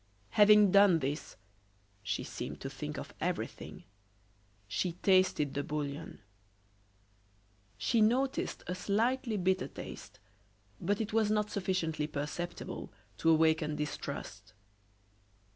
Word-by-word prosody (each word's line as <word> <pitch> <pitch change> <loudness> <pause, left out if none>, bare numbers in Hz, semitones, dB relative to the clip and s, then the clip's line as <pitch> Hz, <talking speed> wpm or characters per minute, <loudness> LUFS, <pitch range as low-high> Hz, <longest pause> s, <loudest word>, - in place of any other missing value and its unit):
Having 210 -1 +7
done 200 -3 +7
this 145 0 -3 0.7
she 105 +1 -2
seemed - - -6
to - - -5
think - - -5
of - - -7
everything - - -4 0.8
she 105 - -1
tasted 185 -6 +3
the 140 - -1
bouillon. 145 -5 -5 1.6
She 160 - +2
noticed 255 +5 +1
a 180 - -3
slightly 225 +5 0
bitter 185 0 +1
taste, - - -9 0.6
but 205 +2 0
it 215 -1 -4
was 220 -2 +3
not 210 0 +1
sufficiently 170 -6 -1
perceptible 150 +4 -5 0.3
to 165 - +3
awaken 160 -1 +3
distrust. 150 -6 -5
180 Hz, 110 wpm, -32 LUFS, 150-210 Hz, 1.6 s, Having